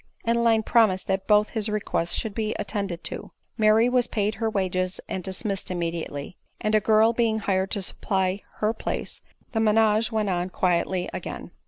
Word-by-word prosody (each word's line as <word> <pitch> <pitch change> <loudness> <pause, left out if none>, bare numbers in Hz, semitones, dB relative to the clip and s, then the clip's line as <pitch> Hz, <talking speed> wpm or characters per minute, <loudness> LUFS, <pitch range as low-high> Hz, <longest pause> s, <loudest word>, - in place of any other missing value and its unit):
Adeline 230 -1 +3
promised 215 -5 +3
that 190 0 -1
both 210 0 +4
his 220 -2 0
requests 205 -5 -1
should 220 - -1
be 215 0 -2
at - - -5
tended 200 -5 -3
to. - - -6 0.3
Mary 220 +1 +4
was 250 -1 +2
paid 210 0 0
her 225 +2 -1
wages 185 -2 -1
and 185 - -4
dismissed 195 +1 -3
im 180 - -2
mediately; 165 -2 -4 0.2
and 215 - -1
a 215 - +6
girl 220 +2 +4
being 230 -2 +1
hired 195 -2 0
to 200 -3 -1
supply 190 0 -1
her 215 +1 0
place, - - -4 0.3
the 225 - -1
menage 220 +1 +3
went 215 -2 0
on 180 -1 -1
quietly 180 0 0
again. - - -6
210 Hz, 180 wpm, -25 LUFS, 185-220 Hz, 0.3 s, a